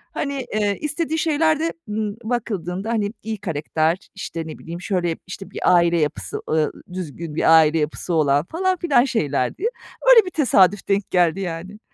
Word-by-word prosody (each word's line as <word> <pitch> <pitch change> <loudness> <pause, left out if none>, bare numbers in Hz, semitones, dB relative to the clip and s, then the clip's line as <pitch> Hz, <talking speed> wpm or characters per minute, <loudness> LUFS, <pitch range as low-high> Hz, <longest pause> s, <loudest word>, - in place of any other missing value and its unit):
Hani, 280 -3 -3
eee, 205 -2 +1
istediği 310 +1 -2
şeyler 315 -1 +2
de, 330 +1 -1 0.2
ımm, 210 -1 -2
bakıldığında, 205 -4 -3
hani, 215 -2 -1
iyi 220 0 -3
karakter, 160 -2 0 0.2
işte 165 -4 -5
ne 155 - -8
bileyim, 170 +2 -8
şöyle, 175 -4 -1
işte, 190 +1 -8
bir - - -6 0.2
aile 170 -1 +3
yapısı, 150 -1 -2
ııı, 155 -1 +1 0.2
düzgün 165 -3 -6
bir 165 0 +6
aile 160 +1 +3
yapısı 155 +3 -2
olan, 145 -2 +3
falan 370 - 0
filan 290 -9 +3
şeylerdi. 150 - -1 0.5
Öyle 455 -4 +8
bir 365 - -5
tesadüf 205 - +3
denk 200 0 0
geldi, 175 0 +3
yani. 185 +2 -5
195 Hz, 165 wpm, -22 LUFS, 165-245 Hz, 0.5 s, Öyle